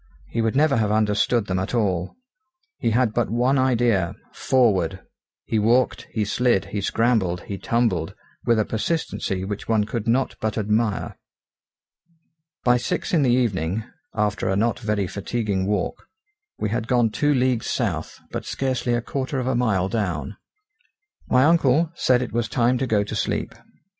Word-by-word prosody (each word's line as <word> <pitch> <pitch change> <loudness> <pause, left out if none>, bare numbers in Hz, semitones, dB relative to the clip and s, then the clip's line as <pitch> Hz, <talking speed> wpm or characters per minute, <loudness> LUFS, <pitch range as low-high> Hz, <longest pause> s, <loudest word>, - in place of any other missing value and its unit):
He 115 - -2
would 115 +1 0
never 145 -1 +3
have 105 -2 +1
understood 105 +1 +2
them 95 -2 -1
at 95 +6 -2
all. 95 -6 0 0.6
He - - +1
had 115 0 +2
but 120 0 0
one 125 +4 +2
idea 120 -8 +2 0.2
forward! 95 -9 +2 0.5
He 110 - 0
walked, 120 +4 +2
he 110 -2 -1
slid, 120 -1 +1
he 105 - -1
scrambled, 100 -5 +1
he 100 +1 -6
tumbled, 115 -10 0 0.3
with 115 - +3
a 110 - +2
persistency 110 - -2
which 105 +1 -5
one 110 -2 +2
could 110 +1 -4
not 130 +3 +1
but 110 0 -1
admire. 105 0 -1 1.4
By 125 0 +4
six 120 - -2
in 165 - +4
the 130 - +3
evening, 110 -5 +1 0.3
after 105 -2 0
a 95 - +1
not 115 +4 +1
very 105 -3 -1
fatiguing 100 0 -2
walk, 100 -3 -2 0.5
we 105 - -2
had 115 0 -2
gone 120 -3 +2
two 145 +5 +1
leagues 125 -2 +1
south, - - -2
but - - -4
scarcely 130 -2 -1
a 120 - 0
quarter 135 +1 -3
of 130 - -1
a 130 - +1
mile 110 -7 +1
down. 95 - -2 0.9
My 125 +1 +5
uncle 160 0 +3
said 125 -6 +2
it 125 - -7
was 120 0 -1
time 125 0 +2
to 130 - -1
go 105 -3 +2
to 105 - -6
sleep. - - -2
115 Hz, 165 wpm, -23 LUFS, 100-125 Hz, 1.4 s, My